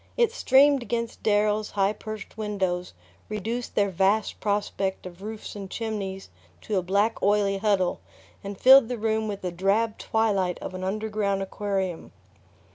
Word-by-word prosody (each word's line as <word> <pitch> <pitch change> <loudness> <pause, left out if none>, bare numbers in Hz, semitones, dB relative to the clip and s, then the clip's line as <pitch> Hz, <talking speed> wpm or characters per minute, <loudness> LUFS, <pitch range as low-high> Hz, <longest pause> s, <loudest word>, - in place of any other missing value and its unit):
It 470 -2 +3
streamed 280 - +4
against 235 -1 -3
Darrow's 210 0 +2
high 200 0 +1
perched 215 -1 -8
windows, 190 -4 -2 0.4
reduced 225 +3 -4
their 200 -1 +2
vast 195 +4 +1
prospect 200 -2 -1
of 180 0 -10
roofs 215 +1 -7
and 195 -2 -7
chimneys 195 - -4 0.3
to 210 - -2
a - - -2
black 200 +5 +1
oily 200 -1 +2
huddle, 195 -4 +1 0.4
and 200 -1 -7
filled 265 -1 +8
the 245 0 -3
room 220 0 0
with 200 -1 -4
the 180 - -2
drab 200 +5 +1
twilight 200 -5 +1
of - - -7
an 185 0 -6
underground 205 0 -1
aquarium. 195 -3 -3
205 Hz, 150 wpm, -26 LUFS, 195-220 Hz, 0.4 s, filled